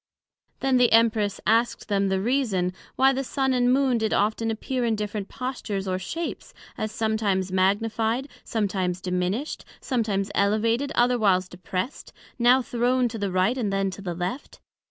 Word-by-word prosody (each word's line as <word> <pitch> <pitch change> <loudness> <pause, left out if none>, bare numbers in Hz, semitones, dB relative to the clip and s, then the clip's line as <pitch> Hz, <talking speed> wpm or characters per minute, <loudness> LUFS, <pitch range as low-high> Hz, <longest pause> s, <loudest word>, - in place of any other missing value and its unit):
Then 265 -1 +3
the 245 -1 +4
Empress 220 -3 +3
asked 230 +2 +1
them 200 -1 +1
the 190 0 +1
reason, 205 -6 0 0.2
Why 270 +1 +4
the 270 +1 -1
Sun 265 0 0
and 245 -1 +3
Moon 260 -2 +3
did 220 -1 0
often 220 +2 +1
appear 245 +3 -2
in 230 -2 +1
different 210 -1 -4
postures 225 -6 -4
or 185 0 -1
shapes, 330 - -5 0.2
as 215 - -3
sometimes 215 -4 0
magnified, 220 +6 +1 0.2
sometimes 190 -5 -1
diminished; 180 - -2 0.2
sometimes 215 -6 -1
elevated, 225 +7 +1
otherwhiles 215 -7 +3
depressed; 185 +6 -5 0.3
now 250 +2 +5
thrown 245 +1 +1
to 225 -1 -6
the 200 -2 -1
right, 185 +6 +2
and 210 -5 -1
then 195 0 0
to 185 - -9
the 175 -3 -4
left? 180 - -5
220 Hz, 155 wpm, -25 LUFS, 195-245 Hz, 0.3 s, now